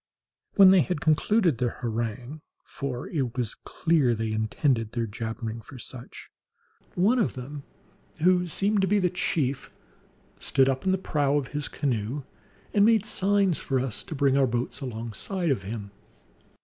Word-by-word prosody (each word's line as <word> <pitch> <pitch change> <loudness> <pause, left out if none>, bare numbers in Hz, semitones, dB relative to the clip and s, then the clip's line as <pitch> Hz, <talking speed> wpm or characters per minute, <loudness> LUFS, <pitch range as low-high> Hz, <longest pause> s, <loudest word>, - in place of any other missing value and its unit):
When 195 -2 +9
they 190 -2 +6
had 180 -3 -1
concluded 165 - +2
their 120 -2 -1
harangue 120 +5 -3 0.2
(for 130 -3 -5
it 130 -7 -2
was 120 -3 -1
clear 150 -8 +1
they 110 0 -2
intended 110 +1 0
their 120 -1 -1
jabbering 115 +1 -5
for 135 - -12
such), 125 0 -9 0.6
one 210 +8 +3
of 215 - 0
them 140 +3 -7 0.6
who 180 +1 +4
seemed 200 +4 +1
to 190 - +2
be 205 +3 +3
the 180 -3 +2
chief 145 -7 -1 0.7
stood 135 -1 +2
up 135 +3 -1
in - - +4
the 190 - +2
prow 145 -6 +1
of 135 -3 -2
his 145 0 -3
canoe, 130 0 -2 0.5
and 205 - +5
made 220 -1 +4
signs 200 -4 +2
for 135 -1 -1
us 125 -4 -3
to 160 - -6
bring 135 -1 +3
our 135 -1 +4
boats 120 +3 -3
alongside 125 - -3
of 125 - 0
him. 100 0 -6
135 Hz, 160 wpm, -27 LUFS, 120-180 Hz, 0.7 s, When